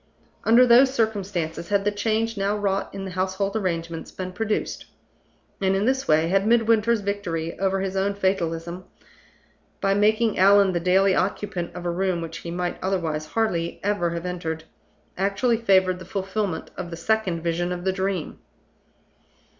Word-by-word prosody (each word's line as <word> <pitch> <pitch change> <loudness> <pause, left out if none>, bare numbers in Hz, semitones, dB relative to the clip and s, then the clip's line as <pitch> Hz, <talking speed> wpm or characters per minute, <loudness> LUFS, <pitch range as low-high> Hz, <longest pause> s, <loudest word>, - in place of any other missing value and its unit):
Under 235 +3 +6
those 250 +2 +6
circumstances 195 -9 -2
had 200 -1 +1
the 205 - +2
change 220 +2 -1
now 200 +1 0
wrought 195 -1 -1
in 195 0 -6
the 190 - -6
household 190 +2 -1
arrangements 170 -5 -3
been 185 -1 -6
produced; 215 +2 -2 0.8
and 190 0 +2
in 195 +2 +1
this 265 +2 0
way 155 +1 +3
had 195 +3 +2
Midwinter's 230 -1 +3
victory 175 -5 -3
over 195 0 +1
his 195 0 -3
own 195 +1 0
fatalism 175 -2 -2 0.9
by 195 0 +2
making 215 +1 +2
Allan 195 0 +6
the 175 - 0
daily 190 +3 +3
occupant 185 -2 -2
of 180 -1 -7
a 175 - 0
room 185 0 0
which 165 0 -6
he 170 - -7
might 175 +1 -3
otherwise 165 -5 -1
hardly 175 -7 -1
ever 205 -4 +1
have 170 +1 -4
entered 165 -3 -4 0.6
actually 205 +5 +1
favored 190 -4 +3
the 185 - -10
fulfillment 190 -1 -3
of 175 - -6
the 170 - -7
Second 185 -3 0
Vision 175 +1 -1
of 175 0 -4
the 190 0 +1
Dream. 190 -3 -3
190 Hz, 160 wpm, -24 LUFS, 175-205 Hz, 0.9 s, Under